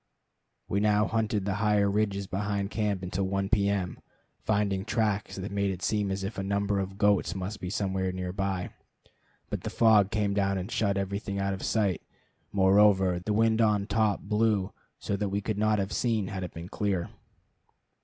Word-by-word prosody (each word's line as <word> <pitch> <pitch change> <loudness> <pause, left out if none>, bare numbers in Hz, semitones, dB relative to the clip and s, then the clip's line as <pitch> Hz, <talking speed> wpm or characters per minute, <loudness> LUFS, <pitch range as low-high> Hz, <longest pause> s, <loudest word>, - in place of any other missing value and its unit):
We 100 - 0
now 105 0 +3
hunted 110 -2 -1
the 100 - 0
higher 105 -2 +3
ridges 100 -1 0
behind 100 +1 -2
camp 105 -4 -1
until 90 +1 -2
1 95 0 -1
P. 100 -1 +3
M., 95 -3 -2 0.4
finding 100 -3 0
tracks 105 -2 -1
that 95 +1 -5
made 100 0 0
it 95 -1 -5
seem 105 -2 0
as 95 0 -3
if 100 +1 -4
a - - -2
number 100 0 0
of 95 0 -4
goats 100 -4 +2
must 95 +2 -4
be 90 - -5
somewhere 95 -2 -1
near 90 0 -4
by. 95 -2 -2 0.8
But - - -2
the - - -4
fog 110 -4 +4
came 105 -2 0
down 100 -1 +1
and 95 +4 -5
shut 100 -3 +1
everything 100 +1 -3
out 100 0 0
of 95 - -6
sight; 100 -6 0 0.5
moreover, 95 -2 +4
the 90 +4 -3
wind 110 +1 +3
on 105 -2 +2
top 105 0 +1
blew 105 -1 +1 0.2
so 100 - -2
that 100 0 -2
we 100 +1 -1
could 105 0 -3
not 110 0 +3
have 100 0 -2
seen 110 -5 0
had 95 -1 -4
it 90 - -7
been 85 +1 -7
clear. 100 -5 -2
100 Hz, 190 wpm, -28 LUFS, 95-105 Hz, 0.8 s, fog